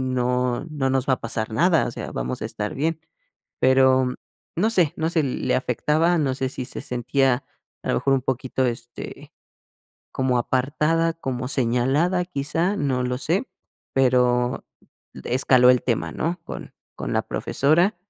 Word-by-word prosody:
no 125 0 0
no 140 -3 -1
nos 135 0 0
va 130 - +5
a - - -13
pasar 110 -1 -3
nada, 165 +7 +3
o - - -3
sea, - - -7
vamos - - -3
a - - -2
estar 105 0 -4
bien, 160 +3 -1 0.6
pero 130 -1 +4 0.4
no 200 +7 +2
sé 180 -9 +2
no 160 +1 0
sé, 165 -2 +1
le 130 -1 -1
afectaba, 150 +7 +1
no 135 -4 0
sé 130 0 -2
si 130 -1 -5
se - - -6
sentía 125 +1 0 0.4
a - - -5
lo - - +2
mejor 135 - +2
un 135 - +2
poquito, 130 +1 -1
este, 120 0 -6 0.8
como 130 -1 +1
apartada, 150 +7 +1
como 130 -6 -4
señalada 135 +8 +1
quizá, 170 +4 -1
no 135 -8 0
lo 125 0 -2
sé, 170 - -1 0.4
pero 125 -1 +2 0.6
escaló 125 0 +5
el 125 -1 +3
tema, 120 -4 -1
¿no? 170 +3 -2
Con - - -8 0.2
con - - -4
la - - +1
profesora. 170 +8 +1
130 Hz, 160 wpm, -23 LUFS, 125-155 Hz, 0.8 s, va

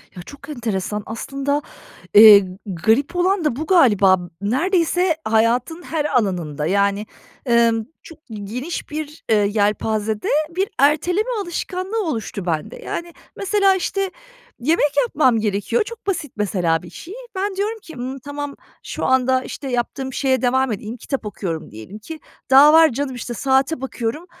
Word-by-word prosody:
Ya, 180 - -8
çok 285 - -13
enteresan. 210 -5 -3
Aslında, 275 +5 -2 0.5
eee, 205 -2 +9 0.2
garip 220 - +1
olan 360 -1 +1
da 270 - +1
bu 310 +5 -4
galiba. 205 - +5
B 175 0 -9
neredeyse 335 - +1
hayatın 235 +9 +1
her 315 -3 -2
alanında, 180 - -1
yani, 200 +3 +1 0.4
emm, 230 -2 +3 0.2
çok 325 -1 -13
geniş 230 - -5
bir, 305 0 -6
eee, 220 - +5
yelpazede 210 +1 0 0.2
bir 380 +4 -1
erteleme 350 - +2
alışkanlığı 375 +3 -3
oluştu 225 - -4
bende. 160 -3 -2
Yani, 340 0 -6 0.2
mesela, 395 -1 +2
işte, 390 +1 -1 0.5
yemek 295 +2 +2
yapmam 255 -4 +2
gerekiyor. 210 - 0
Çok 465 0 -11
basit, 340 -8 -2
mesela, 175 -5 0
bir 175 - -10
şey. 345 - -10 0.2
Ben 390 +1 -2
diyorum 420 +3 -2
ki: 325 -7 -12
"Hımm, 255 +2 -5
tamam, 285 +1 -6 0.3
şu - - -4
anda, 260 0 +2
işte, 275 - -7
yaptığım 260 +2 -3
şeye 260 -2 +1
devam 260 0 +2
edeyim.” 215 +3 -5
Kitap 260 0 -4
okuyorum 175 -6 -5
diyelim 110 - -10
ki, 315 +9 -9 0.3
”daha 280 +3 +8
var 320 0 +7
canım." 265 +1 -3
İşte, 245 0 -5
saate 265 +3 +1
bakıyorum: 265 +4 -4
260 Hz, 150 wpm, -20 LUFS, 210-320 Hz, 0.5 s, eee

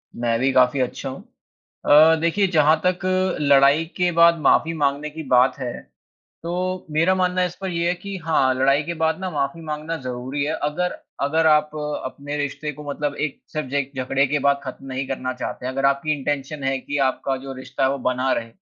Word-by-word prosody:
मैं 115 -1 0
भी 135 +1 +2
काफ़ी 130 +1 +4
अच्छा 130 +2 -2
हूँ। 130 - -8 0.6
अ, 155 +2 +7
देखिए 195 +4 +2
जहाँ 155 -1 +4
तक 180 0 +2 0.4
लड़ाई 140 +2 +5
के 180 -1 +2
बाद 170 0 +5
माफ़ी 165 +3 +3
माँगने 145 +1 0
की 160 +1 -8
बात 125 +1 +4
है, 125 -2 -3 0.7
तो 180 +2 -3
मेरा 165 +5 +3
मानना 185 0 +1
इस 180 - -5
पर 190 - -2
ये 170 0 0
है - - +2
कि 200 +2 -7
हाँ 135 -5 +3
लड़ाई 135 +3 +3
के 170 - -4
बाद 160 +2 +1
ना 190 - -3
माफ़ी 145 +2 -2
माँगना 155 +2 -4
ज़रूरी 130 +3 -4
है, 155 - -1
अगर 165 +5 -1 0.2
अगर 160 +3 +2
आप 150 -1 +3 0.3
अपने 145 +3 -5
रिश्ते 145 +1 -3
को 150 - -10
मतलब 145 0 -2
एक 150 -2 -3
सिर्फ़ 155 -3 -3
ज - - -10
एक 140 -1 -1
झगड़े 135 +2 +1
के 150 +2 0
बाद 140 0 +2
ख़त्म 135 0 -8
नहीं 130 0 -4
करना 130 -1 -3
चाहते 125 0 -6
हैं। 130 - -2
अगर 135 +1 0
आपकी 140 +3 +2
इंटेंशन 140 +1 -3
है 135 0 0
कि 145 +2 -4
आपका 135 +1 -2
जो 135 - -6
रिश्ता 130 0 -4
है 130 - +4
वो 140 - -2
बना 130 +1 0
रहे, 115 0 -4
145 Hz, 210 wpm, -22 LUFS, 135-160 Hz, 0.7 s, अ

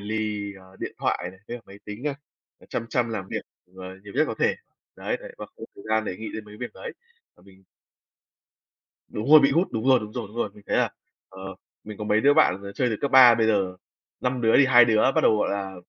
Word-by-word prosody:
lì, 105 -1 -3
ờ, 95 0 -18
điện - - -4
thoại 90 - -1
này, 95 0 -18
với 120 0 -6
máy 100 +1 -13
tính 105 +5 -8
à, 140 - -3 0.5
chăm 115 - -4
chăm 120 -2 0
làm 95 -4 -5
việc, - - -4 0.3
ờ, 95 - -9 0.2
nhiều 100 - -10
nhất 155 - +3
có - - -3
thể. - - +2 0.4
Đấy, - - -3
đấy, - - -10
và - - -7
không - - -34
có - - -9
thời 100 - -14
gian 110 0 +1
để 90 - -4
nghĩ 110 +2 -7
đến 110 - -6
mấy 105 0 -13
việc 125 +2 -6
đấy. 485 -2 -8 0.4
Và - - -23
mình 95 0 -20 1.4
Đúng 110 +6 -4
rồi, 155 0 +10
bị 140 - +4
gout, 170 +6 +2
đúng 110 +2 -3
rồi, 130 -1 +6
đúng 105 0 -8
rồi, 120 -2 -5
đúng 110 - -15
rồi. 120 - -1
Mình 105 - -16
thấy - - 0
là, - - +2 0.4
ờ, 95 0 -9 0.3
mình 105 -1 -9
có 105 - -5
mấy 105 +1 +2
đứa 145 +4 +4
bạn, 95 -6 +3
ờ, 100 0 -8
chơi 125 +5 0
từ 110 - -2
cấp 140 - -1
3, 130 -3 +8
bây 110 -1 +1
giờ 95 -4 0 0.4
5 125 0 -1
đứa 115 -1 +3
thì 140 - +6
2 120 -2 +7
đứa 110 -2 +2
bắt - - +3
đầu, 110 - +4
gọi - - 0
là, 100 -1 -4
110 Hz, 255 wpm, -25 LUFS, 100-120 Hz, 1.4 s, rồi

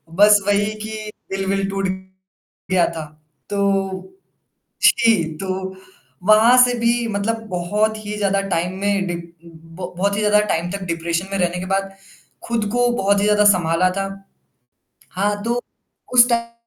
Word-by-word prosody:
बस 205 +2 +6
वही 205 +1 +1
कि 215 0 -6 0.2
दिल-विल 195 0 -1
टूट 195 0 -2
गया 190 -1 -4
था। 160 -1 -5 0.4
तो 200 - -2 0.7
जी 225 -7 +4
तो, 190 0 -4 0.5
वहाँ 215 +5 +6
से 245 - 0
भी 235 0 +1
मतलब 220 +2 -2
बहुत 210 +5 0
ही 210 0 -4
ज़्यादा 200 -1 +1
टाइम 175 0 -1
में 200 -1 0
डीप 170 -1 -6
ब 165 +2 -10
बहुत 200 +2 0
ही - - -1
ज़्यादा 210 0 +4
टाइम 170 -1 -1
तक 200 0 -5
डिप्रेशन 170 +2 -2
में 195 - -1
रहने 180 0 0
के 185 - -5
बाद। 195 0 -1 0.5
खुद 230 -2 -1
को 245 0 +2
बहुत 200 -2 +2
ही - - 0
ज़्यादा 210 0 +3
संभाला 180 -2 +3
था। 195 0 -1 1.1
हाँ 205 +2 -1
तो। 240 +1 0 0.5
उस 245 0 +7
टा 235 0 -1
195 Hz, 150 wpm, -20 LUFS, 185-210 Hz, 1.1 s, उस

